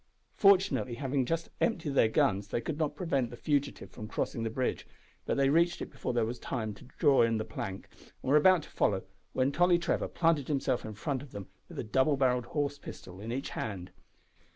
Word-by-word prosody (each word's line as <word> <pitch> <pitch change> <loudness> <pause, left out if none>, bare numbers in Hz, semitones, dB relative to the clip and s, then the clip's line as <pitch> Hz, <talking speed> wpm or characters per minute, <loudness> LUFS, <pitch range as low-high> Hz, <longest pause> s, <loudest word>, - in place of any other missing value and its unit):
Fortunately, 195 - +4
having 135 -1 -1
just 165 +2 -2
emptied 165 -10 0
their 125 - +5
guns, 100 -2 +1
they 110 - -1
could 150 +5 -4
not 150 -2 0
prevent 140 -8 0
the - - -8
fugitive 145 0 -1
from 110 -3 -8
crossing 115 - -2
the 115 - -1
bridge, 125 +3 -2 0.4
but - - 0
they 135 0 +4
reached 170 +4 +3
it - - -6
before - - -3
there 120 -2 +1
was 120 +2 -4
time 110 -5 -3
to 100 - -15
draw 145 -4 +5
in 115 -1 +3
the 110 - -2
plank, 100 -3 -6 0.4
and 130 - -1
were - - +6
about 170 +2 +6
to - - -13
follow, 95 -2 +1 0.3
when 130 +1 +2
Tolly 175 +3 +4
Trevor 170 - 0
planted 165 -5 +1
himself 135 -4 0
in 110 -1 -6
front 135 +5 -2
of 140 -2 -12
them 100 -2 -7 0.2
with - - -10
a - - -2
double 130 +6 +2
barrelled 125 -2 +2
horse 145 -1 -2
pistol 95 -6 -10
in 110 +2 -5
each 135 +3 -3
band. 95 -5 -5
130 Hz, 215 wpm, -31 LUFS, 115-150 Hz, 0.4 s, were